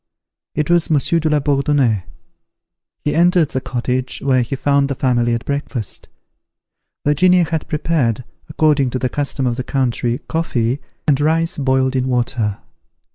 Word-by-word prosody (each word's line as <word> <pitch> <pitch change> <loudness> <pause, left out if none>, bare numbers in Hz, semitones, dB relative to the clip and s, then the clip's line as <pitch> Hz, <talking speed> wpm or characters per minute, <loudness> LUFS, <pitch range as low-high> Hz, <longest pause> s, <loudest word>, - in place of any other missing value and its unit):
It 150 - 0
was 175 -2 +3
Monsieur 160 +2 +2
de 160 -1 0
la 150 -1 +3
Bourdonnais. 140 - +1 1.0
He 150 - +1
entered 175 -2 +3
the 130 - -3
cottage, 125 +1 -2
where 130 -2 +2
he 120 +3 -2
found 140 +1 +1
the 140 - -2
family 120 -2 +1
at 115 - -5
breakfast. 140 -6 -4 1.0
Virginia 180 +5 +4
had 160 -1 -3
prepared, 150 -8 0 0.3
according 150 -3 +2
to 130 - -2
the 130 0 -1
custom 140 0 -2
of 120 -1 0
the 130 - -2
country, 120 -2 0
coffee, 130 -6 -1 0.3
and 145 -1 +3
rice 165 +2 +1
boiled 130 -1 +1
in 130 0 0
water. 120 -4 0
135 Hz, 150 wpm, -18 LUFS, 125-150 Hz, 1.0 s, Virginia